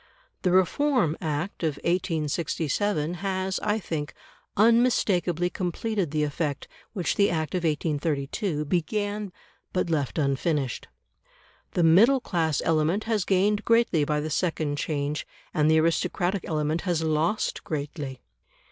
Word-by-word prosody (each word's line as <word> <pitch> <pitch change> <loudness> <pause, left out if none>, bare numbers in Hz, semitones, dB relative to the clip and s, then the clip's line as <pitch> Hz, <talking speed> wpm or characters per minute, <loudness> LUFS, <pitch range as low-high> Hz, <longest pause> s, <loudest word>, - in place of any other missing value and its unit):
The 180 - +1
Reform 190 - +2
Act 155 +3 -3
of 155 -4 0
1867 165 0 0
has, 190 -1 -1
I 210 0 0
think, 160 -7 -4 0.4
unmistakably 200 -6 +3
completed 190 +1 -2
the 150 +1 0
effect 145 -1 -2 0.3
which 180 -7 -1
the 200 - +4
Act 160 -3 -2
of 180 - +1
1832 150 +1 -1
began, 205 +5 -1 0.4
but 180 -2 -1
left 145 -3 -1
unfinished. 140 -2 0 0.9
The 175 - +2
middle 210 +12 +6
class 160 - 0
element 165 +6 +2
has 220 -3 0
gained 205 +2 +2
greatly 230 -9 +3
by 150 0 0
the 155 +1 -4
second 155 -3 -1
change, 145 -1 -2 0.3
and 155 -2 +3
the 160 0 +5
aristocratic 175 +3 0
element 155 +1 0
has 175 -4 0
lost 160 +6 0
greatly. 145 -3 -5
165 Hz, 125 wpm, -26 LUFS, 150-195 Hz, 0.9 s, middle